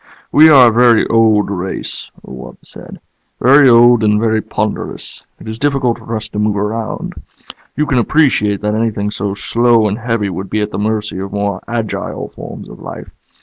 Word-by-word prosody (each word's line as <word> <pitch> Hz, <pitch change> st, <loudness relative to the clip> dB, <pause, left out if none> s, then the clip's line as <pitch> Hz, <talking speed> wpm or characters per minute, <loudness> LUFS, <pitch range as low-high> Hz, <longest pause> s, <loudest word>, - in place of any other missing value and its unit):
"We 155 Hz, +2 st, +6 dB
are 130 Hz, -5 st, +7 dB
a -, -, -3 dB
very 120 Hz, -1 st, +4 dB
old 110 Hz, -3 st, +2 dB
race," 95 Hz, -1 st, -5 dB, 0.2 s
the -, -, -13 dB
wub 65 Hz, -1 st, -10 dB
said. -, -, -13 dB, 0.4 s
"Very 135 Hz, +2 st, +5 dB
old 120 Hz, -1 st, +5 dB
and 105 Hz, 0 st, +2 dB
very 110 Hz, -1 st, 0 dB
ponderous. 105 Hz, -1 st, -5 dB, 0.2 s
It -, -, -12 dB
is 110 Hz, +1 st, -6 dB
difficult 135 Hz, -4 st, 0 dB
for 115 Hz, 0 st, -6 dB
us 110 Hz, 0 st, -4 dB
to 105 Hz, -, -5 dB
move 105 Hz, -1 st, 0 dB
around. 110 Hz, +2 st, -4 dB, 0.6 s
You 150 Hz, -, 0 dB
can 130 Hz, -4 st, +1 dB
appreciate 115 Hz, -7 st, +1 dB
that 105 Hz, 0 st, -1 dB
anything 110 Hz, -2 st, -2 dB
so 100 Hz, -1 st, -4 dB
slow 115 Hz, +1 st, +2 dB
and 105 Hz, +3 st, -3 dB
heavy 115 Hz, -4 st, -2 dB
would 95 Hz, +2 st, -6 dB
be 110 Hz, -, -1 dB
at 105 Hz, 0 st, -3 dB
the -, -, -4 dB
mercy 105 Hz, -2 st, -2 dB
of 95 Hz, +1 st, -6 dB
more 100 Hz, -2 st, -2 dB
agile 115 Hz, -2 st, -4 dB
forms -, -, -10 dB
of -, -, -13 dB
life. -, -, -9 dB
110 Hz, 190 wpm, -15 LUFS, 105-120 Hz, 0.6 s, are